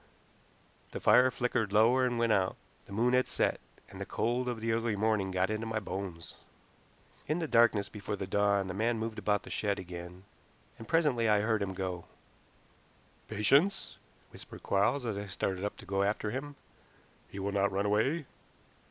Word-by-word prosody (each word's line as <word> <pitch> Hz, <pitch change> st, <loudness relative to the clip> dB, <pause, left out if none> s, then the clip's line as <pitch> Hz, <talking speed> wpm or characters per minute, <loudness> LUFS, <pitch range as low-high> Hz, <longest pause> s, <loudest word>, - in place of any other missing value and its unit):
The -, -, -4 dB
fire 130 Hz, +1 st, +6 dB
flickered 120 Hz, -4 st, -1 dB
lower 120 Hz, +5 st, +4 dB
and 120 Hz, -1 st, -2 dB
went 115 Hz, -1 st, +2 dB
out. 95 Hz, -3 st, +2 dB, 0.3 s
The -, -, -14 dB
moon 120 Hz, +5 st, +1 dB
had 125 Hz, 0 st, +3 dB
set, -, -, 0 dB, 0.3 s
and -, -, -11 dB
the -, -, -3 dB
cold 120 Hz, +3 st, -1 dB
of 120 Hz, -2 st, -3 dB
the 115 Hz, +1 st, -1 dB
early 115 Hz, -1 st, 0 dB
morning 105 Hz, -2 st, +1 dB
got 95 Hz, +2 st, 0 dB
into 110 Hz, +1 st, -3 dB
my 110 Hz, -1 st, -1 dB
bones. 95 Hz, -4 st, -6 dB, 0.9 s
In 155 Hz, -, 0 dB
the 165 Hz, -2 st, -2 dB
darkness 115 Hz, -5 st, +4 dB
before 105 Hz, 0 st, -5 dB
the 95 Hz, -, -4 dB
dawn 100 Hz, 0 st, +1 dB
the 95 Hz, -, -4 dB
man 115 Hz, +4 st, 0 dB
moved 110 Hz, 0 st, -4 dB
about 105 Hz, -1 st, 0 dB
the -, -, -10 dB
shed 100 Hz, -2 st, -1 dB
again, 90 Hz, 0 st, -8 dB, 0.6 s
and 115 Hz, -, -9 dB
presently 140 Hz, -9 st, +2 dB
I 105 Hz, -1 st, +4 dB
heard 110 Hz, 0 st, +1 dB
him 95 Hz, -1 st, -3 dB
go. 90 Hz, -2 st, -4 dB, 1.2 s
"Patience!" 140 Hz, -, +2 dB, 0.3 s
whispered -, -, -12 dB
Quarles, 120 Hz, +7 st, +1 dB
as 105 Hz, -4 st, -2 dB
I 100 Hz, -, -6 dB
started 95 Hz, 0 st, -3 dB
up 105 Hz, -, -3 dB
to -, -, -12 dB
go 95 Hz, 0 st, -1 dB
after 105 Hz, +1 st, 0 dB
him. 140 Hz, +4 st, -5 dB, 0.7 s
"He -, -, -10 dB
will 100 Hz, +1 st, -2 dB
not 100 Hz, 0 st, +1 dB
run 100 Hz, +1 st, -1 dB
away." 130 Hz, +10 st, +1 dB
105 Hz, 180 wpm, -31 LUFS, 100-120 Hz, 1.2 s, fire